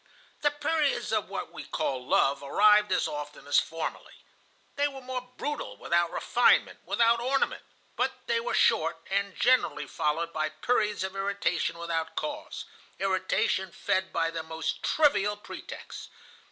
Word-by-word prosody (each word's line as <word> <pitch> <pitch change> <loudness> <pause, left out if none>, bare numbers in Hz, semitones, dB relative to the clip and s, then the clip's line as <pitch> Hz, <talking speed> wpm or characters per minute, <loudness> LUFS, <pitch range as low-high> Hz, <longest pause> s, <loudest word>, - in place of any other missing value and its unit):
"The 290 - +4
periods 295 0 0
of - - 0
what - - -5
we - - -8
call 130 -2 -2
love 140 +2 +2
arrived 210 +8 +5
as - - +2
often 150 -1 -6
as 145 - +4
formerly. 165 0 -5 0.5
They 285 0 +2
were 275 -2 -7
more 255 -1 -4 0.2
brutal, 295 0 -4
without 170 0 +1
refinement, 245 - +3
without 230 0 +3
ornament; 265 +3 0 0.3
but - - -2
they 470 0 +1
were 470 - -2
short, - - +3
and 200 0 0
generally 245 - +2
followed 165 +4 -1
by 155 -1 0
periods 210 +6 0
of 190 +1 -4
irritation 195 -3 -1
without 165 -1 -3
cause, 300 0 -4 0.3
irritation 190 -1 0
fed 190 +2 -1
by 165 0 0
the 165 -1 -3
most 160 0 -4
trivial 210 -10 +3
pretexts. 205 - -9
195 Hz, 145 wpm, -28 LUFS, 165-250 Hz, 0.5 s, arrived